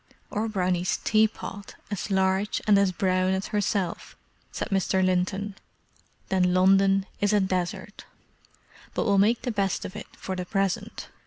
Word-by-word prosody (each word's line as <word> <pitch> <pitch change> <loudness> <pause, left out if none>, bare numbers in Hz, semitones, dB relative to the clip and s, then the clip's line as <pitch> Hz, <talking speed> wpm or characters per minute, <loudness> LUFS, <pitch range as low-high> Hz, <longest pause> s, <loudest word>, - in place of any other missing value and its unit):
"Or 220 +2 -1
Brownie's 180 -3 0
tea 215 0 +4
pot, 200 -2 -9 0.2
as 205 +1 -3
large 190 +1 +1
and 205 -2 +5
as 200 -2 +3
brown 185 0 +1
as 190 - -4
herself," 200 -3 -2 0.3
said - - -4
Mr. 190 -1 +1
Linton—"then 185 -1 -2
London 195 +1 +4
is 205 +1 +2
a 210 - +5
desert. 185 -2 -3 0.9
But - - 0
we'll 200 -2 +3
make 225 +4 +3
the 245 - -1
best 195 -3 -1
of 185 - -7
it 210 - -7
for 190 - -5
the 180 - -3
present. 195 0 -2
195 Hz, 150 wpm, -26 LUFS, 185-205 Hz, 0.9 s, and